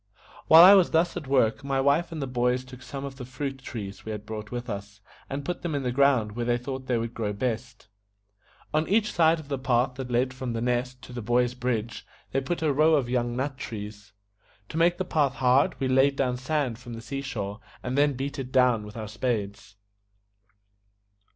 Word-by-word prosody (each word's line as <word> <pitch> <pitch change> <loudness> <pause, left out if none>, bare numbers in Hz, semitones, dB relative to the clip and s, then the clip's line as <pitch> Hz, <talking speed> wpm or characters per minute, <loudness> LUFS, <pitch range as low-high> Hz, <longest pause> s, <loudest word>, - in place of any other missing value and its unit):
While 160 +1 +10
I 190 +2 +10
was 190 -4 +5
thus 165 +2 +2
at 145 - -5
work, 130 -2 +2
my 135 -1 0
wife 140 +6 +2
and 165 - -5
the 140 - -2
boys 125 0 0
took 130 0 -12
some 140 +1 -6
of 135 -1 -8
the 130 - -7
fruit 135 +1 -5
trees 100 -6 -7
we 110 - -5
had 105 -1 -6
brought 110 -1 -6
with 120 +1 -5
us, 100 -1 -6 0.3
and 140 +1 -4
put 175 - -3
them 165 -4 -2
in 140 - -2
the 125 - -1
ground 130 -5 +3
where 120 +3 -3
they 120 0 +2
thought 130 +1 -6
they 125 - +1
would 115 0 -3
grow 105 -3 -2
best. 115 +1 -4 0.9
On 155 +1 +1
each 210 +1 +2
side 165 -1 +4
of 155 - -11
the 140 -2 -3
path 125 -1 +1
that 130 -2 -5
led 125 +1 +1
from 130 -2 -4
The 115 - -2
Nest 125 +1 -3
to 125 - -10
the 120 - -4
Boy's 120 +2 +1
Bridge 120 -3 -3 0.3
they 135 - 0
put 160 +5 -3
a 150 -2 +2
row 155 +3 +4
of 125 -5 0
young 120 -1 0
nut 135 +1 -3
trees. 105 -3 -7 0.6
To - - -5
make 175 +1 +3
the 185 - -2
path 145 -6 +1
hard 130 +2 +3
we 135 - 0
laid 135 +2 +4
down 130 -3 0
sand 130 -2 -2
from 120 -1 -9
the 115 - -8
sea 135 +3 -4
shore, 105 -6 -5 0.2
and 125 +1 -2
then 145 0 +3
beat 135 +2 -4
it 130 -1 -5
down 125 -4 +3
with 105 - -10
our 110 -1 -5
spades. 105 -2 -3
130 Hz, 220 wpm, -26 LUFS, 120-140 Hz, 0.9 s, While